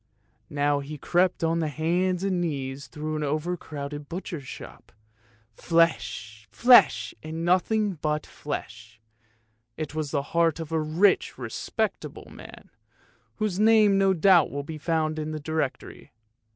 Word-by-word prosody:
Now 145 0 +1
he 145 +2 -7
crept 175 +4 +1
on 165 +1 +1
hands 170 +4 0
and 185 -3 0
knees 140 -4 -4
through 155 +3 -4
an 150 - -2
over 155 +5 -1
crowded 145 -3 -7
butcher's 170 -5 -6
shop. - - -11 0.6
Flesh, 110 -10 0
flesh, 245 0 +5
and 160 +2 -5
nothing 190 +1 +1
but 150 -1 -1
flesh; 110 -6 -7 0.8
it 155 -2 -5
was 155 -2 -3
the 140 -1 -1
heart 165 -1 +2
of 165 -1 -6
a 160 - +1
rich 170 +6 +2
respectable - - -4
man, - - -13 0.6
whose 210 -4 -2
name 215 -2 +5
no 195 -1 +3
doubt 175 -1 +5
will 145 0 -4
be 155 +1 -7
found 155 -1 -1
in 155 0 -4
the 155 - -4
directory. 155 -2 -4
155 Hz, 140 wpm, -26 LUFS, 145-175 Hz, 0.8 s, flesh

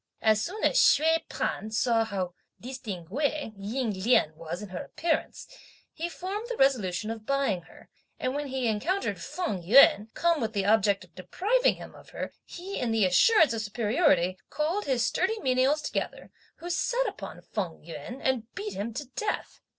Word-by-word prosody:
As 215 -1 +4
soon 415 +5 -5
as - - +3
Hsüeh 325 - +4
P'an 215 - -3
saw 225 +1 +2
how 190 -5 -3 0.3
distinguée 250 - -3
Ying 215 +4 -2
Lien 195 -9 +3
was 165 +5 -6
in 205 - -8
her 180 - -5
appearance, 320 -1 -2 0.5
he 335 +2 -4
formed 395 +6 -5
the 485 - -3
resolution 220 -6 +2
of 220 -1 -8
buying 275 -10 +1
her; 165 - -17 0.3
and 255 - -1
when 290 0 -3
he 260 -2 -1
encountered 325 - -1
Feng 220 - -3
Yüan, 215 +1 +6
come 335 -3 +2
with 225 -1 -2
the 200 -2 0
object 200 -2 +3
of 175 -2 -19
depriving 410 - +1
him - - -11
of - - -15
her, - - -6
he 375 +3 -6
in 245 -3 -1
the 220 -3 +3
assurance 300 - +5
of 225 - -2
superiority, 210 - +2
called 325 +8 -1
his 255 -4 +1
sturdy 445 -1 0
menials 265 +3 +2
together, - - -4 0.2
who 345 +2 -6
set - - +1
upon - - -7
Feng 180 -8 -4
Yüan 230 +9 -7
and 245 -3 0
beat 410 +2 -4
him 220 +3 -4
to 290 - -4
death. 430 - -3
245 Hz, 175 wpm, -28 LUFS, 205-320 Hz, 0.5 s, Yüan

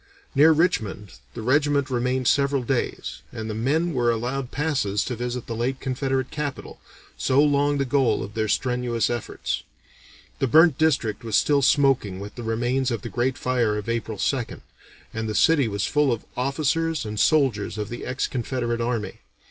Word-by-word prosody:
Near 155 +3 +6
Richmond 115 - 0 0.2
the 115 - -5
regiment 140 +2 +2
remained 125 +1 0
several 140 0 +2
days, 125 +1 -2
and 110 0 -6
the 110 - -3
men 150 +10 0
were 120 -3 +1
allowed 125 +3 -2
passes 135 -10 0
to 125 - -3
visit 120 +1 -4
the 115 - -5
late 130 +3 -2
Confederate 130 0 -2
capital, 145 -2 -5 0.4
so 130 +1 +2
long 145 0 +3
the 140 - 0
goal 135 -1 +1
of 100 +2 -8
their 110 0 -1
strenuous 125 0 0
efforts. 120 -2 -3 0.8
"The 135 - +1
burnt 160 +3 +5
district 125 -9 +1
was 110 -2 -2
still 145 -1 +3
smoking 135 -9 +2
with 100 +1 -8
the 120 - -8
remains 120 +3 0
of 115 -4 -3
the - - -5
great 125 +2 -1
fire 120 -4 0
of 105 - -6
April 115 -2 -2
2nd, 125 +2 -2 0.5
and 110 0 -3
the 105 - -3
city 145 +2 +4
was 100 -1 -1
full 150 -2 +2
of 115 - -3
officers 155 +3 0
and 105 0 -4
soldiers 115 -6 +2
of 105 -1 -4
the 120 - -6
ex 130 0 -2
Confederate 120 -2 -2
army. 115 -5 -2
125 Hz, 175 wpm, -24 LUFS, 115-140 Hz, 0.8 s, Near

